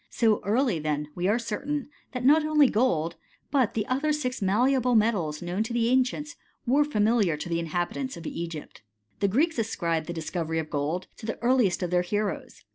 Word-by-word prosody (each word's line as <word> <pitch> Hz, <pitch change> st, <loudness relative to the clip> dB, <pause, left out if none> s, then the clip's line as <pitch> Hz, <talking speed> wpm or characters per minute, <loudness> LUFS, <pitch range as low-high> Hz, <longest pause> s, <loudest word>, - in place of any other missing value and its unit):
So 220 Hz, -3 st, +2 dB
early, 225 Hz, -, +1 dB
then, 150 Hz, -1 st, -2 dB
we 180 Hz, +1 st, -1 dB
are 210 Hz, +3 st, +3 dB
certain, 255 Hz, +5 st, -3 dB, 0.3 s
that 250 Hz, -1 st, -3 dB
not 300 Hz, +3 st, +6 dB
only 305 Hz, -2 st, +5 dB
gold, 170 Hz, -10 st, +1 dB, 0.3 s
but 265 Hz, -6 st, +2 dB
the 215 Hz, -2 st, 0 dB
other 275 Hz, +5 st, 0 dB
six 260 Hz, -5 st, -2 dB
malleable 245 Hz, +5 st, +2 dB
metals 190 Hz, -9 st, +1 dB
known 175 Hz, +4 st, -2 dB
to 225 Hz, +2 st, -2 dB
the 235 Hz, -1 st, +2 dB
ancients, 260 Hz, +4 st, +1 dB, 0.3 s
wer^ 295 Hz, +4 st, +3 dB
familiar 210 Hz, -, +2 dB
to 150 Hz, -, -6 dB
the 170 Hz, -1 st, -1 dB
inhabitants 175 Hz, -, -3 dB
of 170 Hz, -, -10 dB
Egypt. 165 Hz, -2 st, -6 dB, 0.4 s
The 200 Hz, -, +2 dB
Greeks 295 Hz, -, +1 dB
ascribe 170 Hz, -7 st, -1 dB
the -, -, -3 dB
discovery 165 Hz, 0 st, -3 dB
of 160 Hz, -1 st, -3 dB
gold 155 Hz, +5 st, -1 dB
to 220 Hz, -, -8 dB
the 225 Hz, -, -3 dB
earliest 240 Hz, -8 st, +3 dB
of 175 Hz, -, -2 dB
theii: 180 Hz, 0 st, +2 dB
heroes. 205 Hz, +2 st, -3 dB
215 Hz, 190 wpm, -27 LUFS, 170-255 Hz, 0.4 s, not